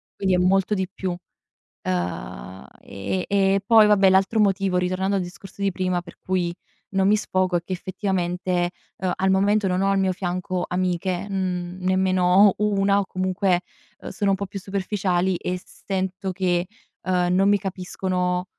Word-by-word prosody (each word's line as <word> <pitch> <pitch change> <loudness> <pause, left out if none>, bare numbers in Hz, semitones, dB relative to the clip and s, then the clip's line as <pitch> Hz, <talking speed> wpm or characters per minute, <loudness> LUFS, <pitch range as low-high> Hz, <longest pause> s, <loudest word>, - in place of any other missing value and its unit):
quindi 190 -1 0
è - - +2
molto 190 +2 +2
di 190 -2 -1
più. 190 -1 -3 0.7
Uhm, 90 -3 -4
ehm, 140 - -4
e 195 -1 +2
poi 220 -1 +7
vabbè, 195 -2 +5
l'altro 190 +4 +3
motivo, 195 -2 +1
ritornando 185 +2 0
al 190 - +1
discorso 185 +2 -10
di 200 -1 +1
prima, 185 -1 -1
per 175 -1 -14
cui 180 -2 -1 0.4
non 190 -1 +2
mi 210 - +5
sfogo 185 -3 0
è - - -4
che 185 - -10
effettivamente, 180 -1 -1 0.3
uhm, 185 0 -1
al 190 +1 +1
momento 200 +2 +3
non 185 0 0
ho 195 - +2
al 195 - +2
mio 190 -1 +2
fianco 185 0 -3
amiche, 180 +1 -1
mhmm, 185 -2 -2
nemmeno 185 +1 +4
una 200 -1 +2
o 200 - -1
comunque, 185 -1 0 0.4
uhm, - - -8
sono 200 -1 0
un - - +3
po' 200 +1 -4
più 195 +1 -6
superficiali 190 -2 -1
e 180 0 -3
sento 190 0 -4
che, 180 -1 0 0.4
uhm, 180 -1 +1
non 195 +2 +3
mi 205 - +5
capiscono, 180 -1 -2
185 Hz, 170 wpm, -23 LUFS, 180-195 Hz, 0.7 s, poi